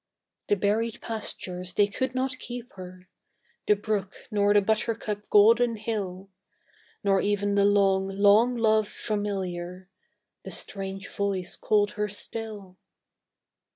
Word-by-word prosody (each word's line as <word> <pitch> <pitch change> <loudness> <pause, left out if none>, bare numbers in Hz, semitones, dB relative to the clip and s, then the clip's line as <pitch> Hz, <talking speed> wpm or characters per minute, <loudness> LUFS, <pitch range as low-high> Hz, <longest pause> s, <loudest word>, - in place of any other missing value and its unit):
The 205 - +3
berried 215 +3 0
pastures 185 -5 -5
they 205 - +5
could 255 +6 -3
not 260 0 -1
keep 245 +1 -7
her, 185 0 -11 0.6
The 210 - +5
brook, 205 -2 -2 0.2
nor 205 -1 +3
the 205 - +6
buttercup 215 -1 -1
golden 230 +3 +5
hill, 195 -3 -4 0.7
Nor 195 -1 +3
even 205 0 0
the 200 0 +4
long, 195 -1 +3
long 205 +5 +4
love 220 -2 +3
familiar, 190 -4 -4 0.5
The - - -7
strange 195 -1 -4
voice 195 -3 -2
called 205 -1 +2
her 210 0 -2
still. 205 -2 -6
205 Hz, 120 wpm, -27 LUFS, 195-220 Hz, 0.7 s, the